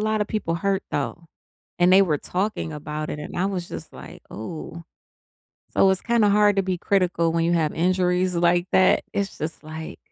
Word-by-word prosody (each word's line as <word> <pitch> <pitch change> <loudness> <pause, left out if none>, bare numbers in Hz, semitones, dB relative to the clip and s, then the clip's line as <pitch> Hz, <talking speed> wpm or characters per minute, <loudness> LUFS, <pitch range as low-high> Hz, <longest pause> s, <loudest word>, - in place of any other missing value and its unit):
lotta 215 0 +1
people 205 -6 -2
hurt, 195 +2 0
though, 165 +4 -3 0.5
and 175 +1 +4
they 195 +1 +8
were 155 -6 +1
talking 185 -4 -3
about 150 +1 -5
it, 150 - -5
and 150 - -7
I 185 - +1
was 185 -3 -3
just - - -8
like, - - -11
"Ooh." 160 +8 -7 0.9
So, 195 - +4
it's 190 - +1
kinda 230 -3 +3
hard 205 0 +4
to 195 - +3
be 185 -2 -2
critical 175 -4 +1
when 165 0 +1
you 170 - +2
have 160 -3 +1
injuries 180 +1 +1
like 175 +1 +2
that. 185 - +4
It's 200 -1 -2
just 155 0 -5
like 160 +1 -8
180 Hz, 190 wpm, -23 LUFS, 165-195 Hz, 0.9 s, they